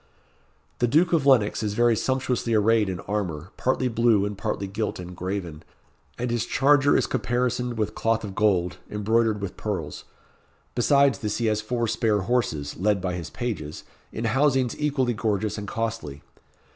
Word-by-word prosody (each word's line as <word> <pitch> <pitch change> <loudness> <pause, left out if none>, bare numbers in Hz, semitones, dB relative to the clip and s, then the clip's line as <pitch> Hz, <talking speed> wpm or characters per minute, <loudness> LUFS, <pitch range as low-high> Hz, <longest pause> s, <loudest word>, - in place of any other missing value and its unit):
The 120 - +3
Duke 165 +8 +3
of 150 -4 +2
Lennox 115 -7 +4
is 105 -2 -2
very 120 0 +4
sumptuously 125 -1 0
arrayed 110 -1 +3
in 90 -2 -4
armour, 90 -5 -3
partly 130 0 0
blue, 115 -3 +3
and 105 0 -4
partly 100 - -3
gilt 105 +3 -3
and 90 0 -8
graven, 90 -4 -4 0.6
and 125 0 -2
his 120 -2 -1
charger 145 +1 +4
is - - +2
caparisoned 125 -1 -1
with 110 -1 -1
cloth 115 0 0
of 100 -2 -5
gold, 95 -4 +1
embroidered 110 0 +1
with 100 -2 -5
pearls. 90 -9 -4 0.7
Besides 140 -2 +3
this 105 -1 -2
he 120 - -1
has 110 -1 +1
four 120 +1 -1
spare 110 -2 +1
horses, 95 -10 -1
led 100 +2 +1
by 90 -1 -2
his 90 -2 -5
pages, 90 -11 -5 0.3
in 110 - -5
housings 130 +1 +2
equally 140 -5 +1
gorgeous 105 -1 -1
and 100 - -6
costly. 110 -11 -4
110 Hz, 165 wpm, -25 LUFS, 100-120 Hz, 0.7 s, Lennox